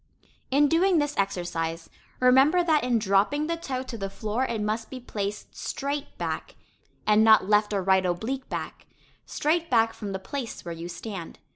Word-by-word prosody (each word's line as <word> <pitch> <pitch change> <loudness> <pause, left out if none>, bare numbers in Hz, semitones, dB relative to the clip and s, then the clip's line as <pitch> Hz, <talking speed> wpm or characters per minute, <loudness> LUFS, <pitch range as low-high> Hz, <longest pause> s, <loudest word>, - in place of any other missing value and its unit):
In 285 +2 +4
doing 345 +4 +3
this 290 -1 0
exercise, 175 -4 -2 0.3
remember 270 +8 +5
that 315 -3 +2
in 245 -1 +2
dropping 210 +8 +2
the 335 +1 -1
toe 265 -6 -4
to 235 -3 -7
the 195 0 -3
floor 215 +5 -2
it 230 -3 -2
must 215 +2 -2
be 260 - -7
placed 205 -4 -5
straight 285 +1 -4
back, - - -4 0.5
and 215 0 +5
not 220 -3 +6
left 210 0 +3
or 200 -2 0
right 190 0 +4
oblique 220 +10 -2
back; - - -6 0.4
straight 330 +3 0
back 225 -3 +3
from 205 -3 -6
the 190 - -2
"place" 230 +5 -6
where 170 - -4
you 165 +1 -7
stand. 180 -1 -7
225 Hz, 175 wpm, -26 LUFS, 195-280 Hz, 0.5 s, not